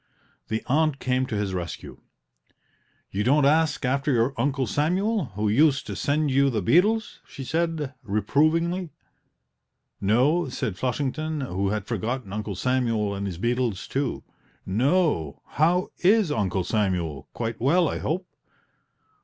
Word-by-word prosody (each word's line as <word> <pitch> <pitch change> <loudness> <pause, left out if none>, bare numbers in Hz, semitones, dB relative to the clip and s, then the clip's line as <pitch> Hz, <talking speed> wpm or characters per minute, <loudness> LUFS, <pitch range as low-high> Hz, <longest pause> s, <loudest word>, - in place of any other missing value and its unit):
The 110 0 -2
aunt 155 +1 +2
came 130 -1 0
to 110 - -3
his 100 -2 -2
rescue: 90 -2 -6 1.1
"You 100 +2 -1
don't 140 +4 +4
ask 155 -1 +2
after 140 +3 +1
your 120 +1 +2
Uncle 135 +2 0
Samuel, 185 - 0
who 105 +1 0
used 140 +5 +3
to - - -5
send 145 0 0
you 140 +1 +4
the 115 -4 -1
beetles?" 210 - +2
she 135 - -8
said, 160 -1 -1
reprovingly. 155 - +1 1.1
"No," 130 - +2
said 110 -5 -3
Flushington, 145 +6 -2
who 100 -6 -1
had 105 -1 -2
forgotten 115 0 -3
Uncle 105 -1 -4
Samuel 115 -2 0
and 100 0 -3
his 90 -4 -5
beetles, 120 -1 -1
too; 135 -2 -2 0.4
"no, 125 - +1
how 175 +4 +2
is 195 -2 +4
Uncle 95 -6 0
Samuel 90 - -1
quite 115 -1 -4
well, 165 +7 +3
I - - -2
hope?" 180 +4 -2
130 Hz, 135 wpm, -25 LUFS, 105-155 Hz, 1.1 s, don't